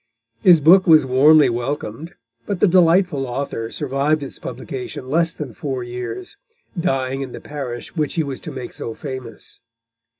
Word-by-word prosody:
His 170 +2 +6
book 185 +6 +6
was 155 -4 +6
warmly 145 +4 +6
welcomed, 130 - -4 0.3
but 200 -3 -2
the 210 - +5
delightful 175 -5 +3
author 120 -3 -4
survived 145 +2 -1
its 135 - -9
publication 130 -3 -7
less 165 +1 +1
than 140 -6 -6
four 130 0 -4
years, 125 - -6 0.4
dying 135 -6 -1
in 130 -2 -6
the - - -7
parish 135 -4 -7
which 150 -3 -1
he 165 - +1
was 140 -3 -5
to - - -8
make 130 -2 -7
so 115 - -6
famous. 130 -5 -8
140 Hz, 160 wpm, -20 LUFS, 130-165 Hz, 0.4 s, His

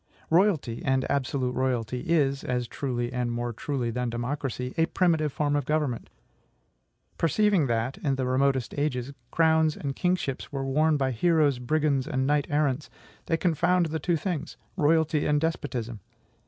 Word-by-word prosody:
Royalty, 165 - +2
and 130 -1 +1
absolute 130 -2 0
royalty, 125 -2 -1
is 140 -3 +1
as 125 -1 -1
truly 120 -2 -3
and 125 -1 -1
more 120 0 -3
truly 125 0 -2
than 125 +1 -2
democracy 125 +1 -3
a 165 0 +2
primitive 160 -5 +1
form 145 +1 0
of 145 - +1
government. 150 -6 -1 1.1
Perceiving 185 -1 +3
that, 115 +2 -1
in 140 -2 0
the 130 -1 -1
remotest 130 -1 +1
ages, 140 -2 -1 0.2
crowns 160 -1 +3
and 140 -1 -4
kingships 180 -7 -1
were 135 -2 -3
worn 150 +3 +2
by 135 -2 0
heroes, 150 0 +2
brigands, 140 +1 +1
and 130 0 0
knight 145 0 +1
errants, 145 -1 0 0.4
they 165 - +1
confound 175 +1 +2
the 160 - -1
two 170 +3 +1
things, 160 -2 -4 0.2
royalty 155 0 +2
and 150 0 +3
despotism. 130 -8 -3
140 Hz, 155 wpm, -27 LUFS, 125-155 Hz, 1.1 s, Perceiving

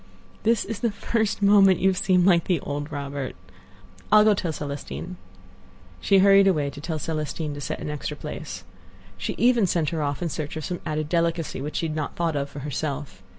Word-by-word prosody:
"This 225 0 +2
is 210 0 -5
the 235 - +1
first 215 0 -1
moment 200 -2 +6
you 190 - +3
have 190 - 0
seemed 185 -3 +3
like 175 -3 +4
the 180 -3 +1
old 145 +1 -4
Robert. 140 -2 -4 0.8
I'll 215 0 +8
go 215 0 +5
tell 180 -4 -2
Celestine." 145 +4 -6 0.8
She 195 - +3
hurried 195 0 +6
away 150 -7 +1
to 140 0 -10
tell 160 0 -3
Celestine 155 -1 -3
to 145 - -7
set 155 +2 -3
an 150 - -4
extra 150 - -4
place. - - -7 0.5
She 95 - -4
even 235 -4 +4
sent 165 -4 +1
her 165 -2 -2
off 145 +3 -2
in 170 - -1
search 150 0 -4
of 155 - -4
some 180 - -4
added 155 0 -2
delicacy 165 -3 0
which 150 +2 -5
she - - 0
had 155 - -4
not 155 -2 -3
thought 165 -2 -1
of 140 0 -2
for 140 0 -8
herself. 145 -5 -4
160 Hz, 205 wpm, -25 LUFS, 145-195 Hz, 0.8 s, I'll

